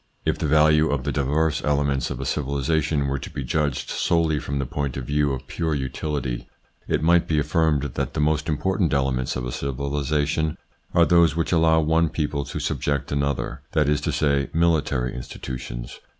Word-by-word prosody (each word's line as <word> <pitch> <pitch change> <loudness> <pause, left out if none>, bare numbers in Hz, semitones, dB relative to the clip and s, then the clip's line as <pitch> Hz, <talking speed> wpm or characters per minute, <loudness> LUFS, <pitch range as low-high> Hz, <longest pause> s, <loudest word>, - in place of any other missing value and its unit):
If - - 0
the - - 0
value 75 +1 +4
of 70 -3 -1
the 70 - -1
diverse 75 +2 0
elements 70 -2 +1
of - - -5
a - - -4
civilisation 75 +1 0
were 70 0 -1
to - - -7
be 70 - -5
judged 70 0 -1
solely 80 -3 +1
from 70 +1 -4
the 70 - -1
point 70 +1 -3
of 65 - -4
view 75 +1 +1
of 65 0 -4
pure 80 0 -2
utility, 65 -2 -3 0.4
it - - 0
might 85 +1 +4
be 80 - +1
affirmed 75 -1 +2
that 70 -2 -3
the - - -1
most 75 +1 +1
important 90 +2 0
elements 65 -2 0
of 65 - -3
a 60 - -4
civilisation 70 +3 -1 0.4
are 85 - +6
those 85 -3 +4
which 85 - -1
allow 80 -1 +4
one 80 +1 +2
people 75 -2 -2
to - - -5
subject 70 -1 -1
another, 70 -1 -1
that 75 -2 +3
is 75 0 +2
to - - -1
say 70 -2 +1
military 75 -7 +1
institutions. 65 -1 -7
75 Hz, 185 wpm, -24 LUFS, 70-80 Hz, 0.4 s, are